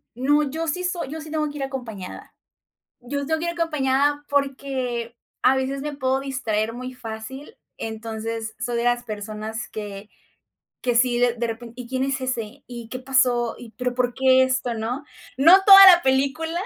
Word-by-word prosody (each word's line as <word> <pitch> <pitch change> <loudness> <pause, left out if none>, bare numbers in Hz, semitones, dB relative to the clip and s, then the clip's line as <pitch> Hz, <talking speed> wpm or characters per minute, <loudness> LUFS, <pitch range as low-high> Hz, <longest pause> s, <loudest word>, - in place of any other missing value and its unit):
No, 290 +5 +2
yo 325 +4 -4
sí 360 +4 -2
soy 355 -5 -3
yo 315 0 -6
sí 310 - -10
tengo 305 -1 -1
que 295 - -8
ir 275 - -3
acompañada. 245 -8 -7 0.7
Yo 280 +3 -4
tengo 320 +2 0
que 340 - -2
ir - - 0
acompañada 290 -3 0
porque, 265 -4 -2 0.3
a 265 - +5
veces, 270 +1 -2
me 295 0 -4
puedo 265 -1 0
distraer 230 -5 -2
muy 255 +2 -7
fácil, 250 - -8 0.2
entonces, 225 0 -5
soy 245 -1 -2
de 235 - -1
las 245 0 +1
personas 215 +1 -6
que 205 -1 -7 0.7
que 245 -2 0
sí, 240 0 +3
de 245 -1 +3
de 235 0 -2
repen: 230 0 -7
"¿Y 250 -1 -8
quién 260 0 -1
es 270 0 -2
ese? 255 0 -4
¿Y 235 -2 -8
qué 255 - -5
pasó? 250 -3 +1
¿Y 235 -2 -11
pero 250 +1 -3
por 245 -1 0
qué 260 0 +4
esto?" 255 -2 -1
¿No? 235 +6 -3 0.3
No 305 +7 +7
toda 390 -1 +11
la 345 - -4
película 275 +5 +1
255 Hz, 185 wpm, -23 LUFS, 235-280 Hz, 0.7 s, toda